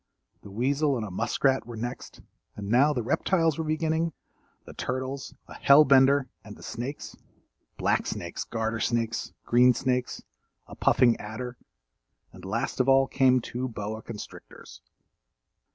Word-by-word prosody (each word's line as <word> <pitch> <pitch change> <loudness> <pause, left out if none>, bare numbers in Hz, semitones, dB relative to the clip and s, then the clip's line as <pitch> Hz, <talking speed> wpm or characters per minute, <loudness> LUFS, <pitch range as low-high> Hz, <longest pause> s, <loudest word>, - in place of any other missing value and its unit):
The - - -12
weasel 135 +6 0
and 110 -2 -4
muskrat 130 +4 +1
were 120 - -7
next, 120 +3 -6 0.3
and 100 -1 -6
now 130 +6 +4
the 125 -5 -2
reptiles 165 - +1
were - - 0
beginning; 160 +1 -1 0.5
the - - -11
turtles, 130 +1 -4
a - - -11
hellbender 140 -1 +5 0.2
and 105 -1 -11
the - - -14
snakes; 125 +5 -6 0.6
black - - 0
snakes, 85 0 -4
garter 115 -1 -3
snakes, 115 -1 -1
green 125 +1 +5
snakes, 125 -1 -2 0.4
a - - -13
puffing 120 -2 +3
adder 120 +4 -6 0.8
and - - -13
last - - -3
of 130 +1 +3
all 135 0 +5
came 130 -1 +3
two 125 +3 -4
boa 110 -1 -5
constrictors. 100 - -11
125 Hz, 135 wpm, -27 LUFS, 115-140 Hz, 0.8 s, hellbender